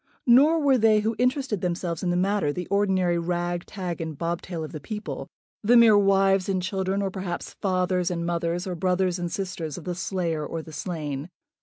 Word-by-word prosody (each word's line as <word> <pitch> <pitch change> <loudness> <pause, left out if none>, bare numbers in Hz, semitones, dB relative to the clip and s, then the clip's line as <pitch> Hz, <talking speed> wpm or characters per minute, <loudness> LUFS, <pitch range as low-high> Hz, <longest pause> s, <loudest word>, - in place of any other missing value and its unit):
Nor 285 +7 +6
were 275 -4 +3
they 215 -1 +4
who 220 +2 -1
interested 250 - 0
themselves 170 -1 -2
in 180 - -1
the 175 - +1
matter 190 -4 +1
the 180 +4 -4
ordinary 190 -4 +2
rag, 175 0 -2
tag, 180 -5 -5
and 160 -3 -5
bobtail 170 0 -3
of 155 - -7
the 155 - -6
people, 210 +7 -6 0.3
the 235 +3 +5
mere 230 -2 +7
wives 195 -1 +3
and 190 -1 +1
children, 190 +1 -1
or 195 - -1
perhaps 185 -2 -5
fathers 185 -2 +1
and 170 -1 -2
mothers, 170 +1 -1
or 185 - -3
brothers 185 0 0
and 175 -1 -3
sisters 175 -6 -4
of 175 - -8
the 180 - -3
slayer 175 -3 -2
or 160 +2 -5
the 160 - -12
slain. 150 -2 -4
180 Hz, 195 wpm, -25 LUFS, 170-200 Hz, 0.3 s, mere